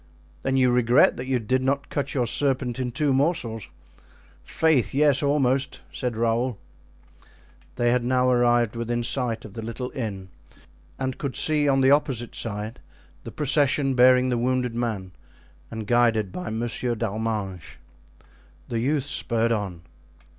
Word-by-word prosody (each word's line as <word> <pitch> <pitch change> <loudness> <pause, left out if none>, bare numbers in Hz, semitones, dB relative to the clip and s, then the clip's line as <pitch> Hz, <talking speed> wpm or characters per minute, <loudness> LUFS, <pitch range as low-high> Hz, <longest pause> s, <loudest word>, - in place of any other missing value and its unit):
"Then 135 +6 0
you 130 -1 +4
regret 125 +2 +4
that 125 - -6
you 130 -1 +1
did 130 +3 0
not 140 +2 -1
cut 145 - -3
your 125 -3 +1
serpent 130 0 -1
in 125 -1 -1
two 140 +3 +1
morsels?" 130 - -1 0.8
"Faith, 155 -7 +1
yes, 145 -1 +3
almost," 140 -2 0
said 125 -4 -3
Raoul. 115 +1 0 1.2
They 120 -1 +2
had 125 0 +1
now 125 +1 +2
arrived 120 -2 +2
within 120 +1 -2
sight 120 -1 -1
of 105 - -11
the 115 - -6
little 115 +3 -5
inn 100 -7 -5 0.7
and 130 -1 -3
could 140 -3 -4
see 150 -2 +2
on 135 -1 +3
the 135 +1 +5
opposite 135 -5 +1
side 110 +1 -5 0.5
the - - -7
procession 140 -1 +2
bearing 125 0 +5
the 120 -1 0
wounded 125 0 0
man 110 -6 -3 0.6
and 110 -1 -6
guided 115 -3 +2
by 180 - -5
Monsieur 120 +2 -2
d'Arminges. 110 -4 -4 0.9
The 115 - -1
youths 140 +3 0
spurred 115 0 +1
on. 95 -6 -3
125 Hz, 145 wpm, -24 LUFS, 115-135 Hz, 1.2 s, the